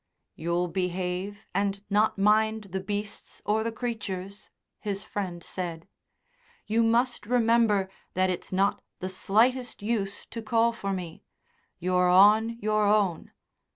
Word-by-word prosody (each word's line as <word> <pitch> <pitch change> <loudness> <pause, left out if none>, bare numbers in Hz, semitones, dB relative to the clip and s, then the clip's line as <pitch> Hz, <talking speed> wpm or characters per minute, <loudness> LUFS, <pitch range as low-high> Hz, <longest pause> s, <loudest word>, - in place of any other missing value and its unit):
"You'll 170 +2 -1
behave, 180 +3 -3
and 200 +1 -1
not 210 +1 +2
mind 215 +2 +3
the 190 - 0
beasts 205 +2 -5
or 220 +1 +1
the 230 - -2
creatures?" 210 -4 -5 0.3
his 200 -1 -4
friend 180 -4 -4
said. 170 -2 -5 0.8
"You 225 +2 +2
must 235 0 +1
remember 230 -4 +3 0.3
that 185 0 +2
it's 180 - -6
not 195 +2 +1 0.2
the 185 - -4
slightest 235 +6 +1
use 205 -3 -2
to 230 - -5
call 230 +1 +2
for 200 -4 -4
me. 180 -4 -5 0.5
You're 180 0 +2
on 215 +5 +6
your 215 0 +2
own. 200 -5 +2
205 Hz, 130 wpm, -27 LUFS, 185-220 Hz, 0.8 s, on